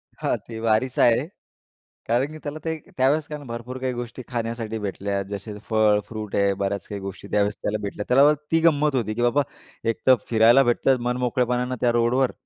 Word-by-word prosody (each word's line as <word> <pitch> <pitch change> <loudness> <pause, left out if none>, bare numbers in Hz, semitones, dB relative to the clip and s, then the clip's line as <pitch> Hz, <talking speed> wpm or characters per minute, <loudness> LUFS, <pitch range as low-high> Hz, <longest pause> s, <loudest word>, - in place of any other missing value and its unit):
हां, - - -1
ते 115 -1 -7
वारीच 115 +3 +1
आहे. 120 +5 +4 0.8
कारण 125 +6 +1
की 155 - -8
त्याला 150 +1 -5
ते 160 0 -1 0.2
त्यावेळेस 140 +4 +2
कारण 150 -2 -7
भरपूर 120 +2 -6
काही 130 -1 -2
गोष्टी 120 +1 -6
खाण्यासाठी 115 -2 -3
भेटल्या. 100 -1 -2
जसे 105 +1 -6
फळ, 110 -2 +4
फ्रूट 110 -2 -6
आहे 100 0 +3
बऱ्याच 100 0 -2
काही 100 -1 -6
गोष्टी 95 0 -7
त्यावेळेस 105 0 +1
त्याला 105 - -1
भेटल्या. 105 +1 -4
त्याला 130 +3 +6
वाटतं 150 0 +3
ती 165 - +5
गंमत 150 -2 +2
होती 115 -4 0
की 120 - -2
बाबा 120 +4 +3 0.5
एक 115 - -1
तर 130 - +8
फिरायला 115 +4 +6
भेटतं 125 +1 +2
मन 125 0 0
मोकळेपणाने 125 0 0
त्या 120 - +3
रोडवर, 120 +2 +2
120 Hz, 195 wpm, -24 LUFS, 110-130 Hz, 0.8 s, तर